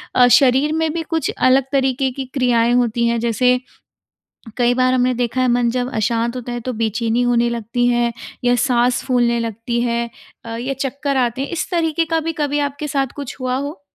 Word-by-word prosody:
अ, 250 -1 +6
शरीर 270 +4 +4
में 320 0 0
भी 335 - -2
कुछ 325 -1 -1
अलग 260 +1 +4
तरीके 265 -1 +1
की 265 +1 -5
क्रियाएँ 240 -3 +2
होती 235 -1 +1
हैं? 235 0 +1
जैसे 245 +2 +2 1.0
कई 245 -1 +2
बार 255 0 +2
हमने 255 0 +2
देखा 245 +1 -1
है, 255 - +2
मन 240 0 +2
जब 250 +1 -2
अशांत 230 +2 0
होता 245 -1 -5
है 240 - -4
तो 255 +2 -4
बेचैनी 225 +1 0
होने 240 -1 +2
लगती 235 +1 -1
है 240 -1 +1 0.3
या 245 0 +4
साँस 245 +1 +1
फूलने 240 -2 +1
लगती 230 +1 -3
है 235 -1 -1 0.3
अ, 230 0 -5
ये 260 +3 -3
चक्कर 280 +1 -2
आते 250 0 0
हैं, - - -4
इस 345 - -4
तरीके 330 -2 +1
का 325 0 0
भी 330 +1 -3
कभी 295 -2 -1
आपके 285 +1 -3
साथ 275 -1 0
कुछ 280 -3 -6
हुआ 255 0 -1
हो? 285 +3 -5
250 Hz, 200 wpm, -19 LUFS, 235-275 Hz, 1.0 s, अ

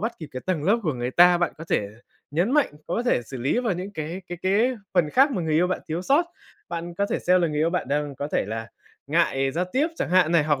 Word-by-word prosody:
bắt 225 +3 -1
kịp 155 -3 -8
cái 130 - -5
tầng 165 -5 -1
lớp 215 +5 +3
của 155 -5 0
người 120 +1 -3
ta, 175 +3 +6
bạn 175 - 0
có 160 - -7
thể 100 - +1 0.4
nhấn 175 - +1
mạnh, 295 - +3
có 200 +7 -1
thể 240 - +1
xử 130 +3 -8
lý 135 - 0
vào 235 -5 0
những 185 +3 -5
cái 165 +3 -5
cái 175 - -6
cái 215 +7 +2 0.2
phần 165 -4 +3
khác 275 +3 +4
mà 185 - -2
người 160 -1 0
yêu 175 +3 +4
bạn 185 - -2
thiếu 165 +3 -2
sót. 280 - +3 0.4
Bạn 170 0 -5
có 200 +3 0
thể 215 - -1
xem 180 0 +3
là 170 - +2
người 150 -1 -3
yêu 160 +2 +2
bạn 180 - -2
đang 145 0 -1
có 145 +3 -4
thể - - +1
là 115 +1 -4 0.4
ngại 140 -3 +1
giao 175 +5 0
tiếp 285 +5 +2
chẳng - - -2
hạn 180 -2 +4
này, 160 -3 +4
hoặc 145 -3 +1
170 Hz, 275 wpm, -24 LUFS, 150-190 Hz, 0.4 s, ta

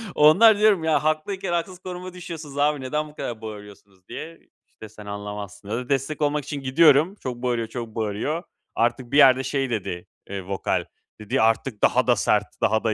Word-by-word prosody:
Onlara 205 +9 +6
diyorum: 210 -6 +4
"Ya, 150 -3 +2
haklıyken 175 +4 -1
haksız 175 +1 -2
konuma 185 0 -7
düşüyorsunuz 160 -5 -8
abi, 145 -1 +2
neden 150 +4 -2
bu 150 - -18
kadar 115 -6 -5
bağırıyorsunuz?" 105 -3 -11
diye, 165 +2 -8 0.3
işte, 110 - -13
"Sen 105 0 -13
anlamazsın." 100 0 -7
Ya 110 - -1
da 125 +1 -5
destek 140 +2 -1
olmak 145 0 +1
için 145 -2 -5
gidiyorum. 150 +6 +4
Çok 130 -11 -5
bağırıyor, 120 -2 0
çok 120 0 -6
bağırıyor. 115 - -2 0.3
Artık 120 +2 0
bir 140 - +2
yerde 130 -2 +7
şey 135 0 -1
dedi, 90 -6 -4 0.2
eee, 95 -1 -5
vokal, 95 -2 -1 0.4
dedi: 105 - 0
"Artık 115 0 +1
daha 125 +1 +3
da 120 - +5
sert, 105 0 0
daha 110 0 +2
da, 110 -1 +1
130 Hz, 185 wpm, -24 LUFS, 110-155 Hz, 0.4 s, yerde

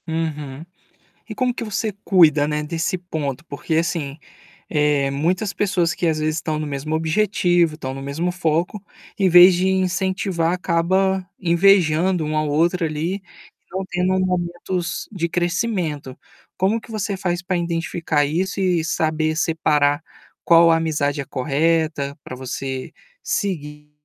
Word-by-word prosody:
Uhum. 155 -3 -4 0.6
E - - -7
como 255 -2 0
que 240 - -5
você 215 +1 -2
cuida, 155 -6 +5
né, 150 0 -1
desse 165 +4 -2
ponto? 160 -5 -4
Porque 150 +2 -3
assim, 160 -3 -1 0.5
eh, 150 -3 +2
muitas 180 +8 0
pessoas 180 -5 +1
que 175 - -1
às 160 -1 +1
vezes 155 0 0
estão 155 -1 -2
no 155 - -3
mesmo 145 +2 -3
objetivo, 175 -1 +2
estão 130 -4 -5
no 135 - -7
mesmo 150 +6 -2
foco, 175 +3 -1 0.4
em 195 - +4
vez 180 +2 +9
de 180 +2 +1
incentivar 185 -2 0
acaba 185 +2 +1
invejando 175 -1 +3
um 155 0 -1
ao 155 0 0
outro 170 +4 +2
ali, 160 +4 -2
e 200 - -8 0.5
não 190 - -1
tendo 180 +1 +1
momentos 180 0 -2
de 175 -5 -2
crescimento. 175 - -2 0.4
Como 195 +5 +1
que 230 - -17
você 205 -2 -2
faz 175 -2 -2
para 185 0 -1
identificar 165 -2 -1
isso 180 +7 -2
e 180 -3 +2
saber 155 -1 0
separar 150 -3 +1 0.4
qual 170 0 +6
a 165 - +4
amizade 150 -3 -1
é - - -7
correta, 150 +1 0
pra 130 - -7
você 130 +1 -5 0.3
seguir 150 -6 -3
165 Hz, 145 wpm, -21 LUFS, 150-185 Hz, 0.6 s, vez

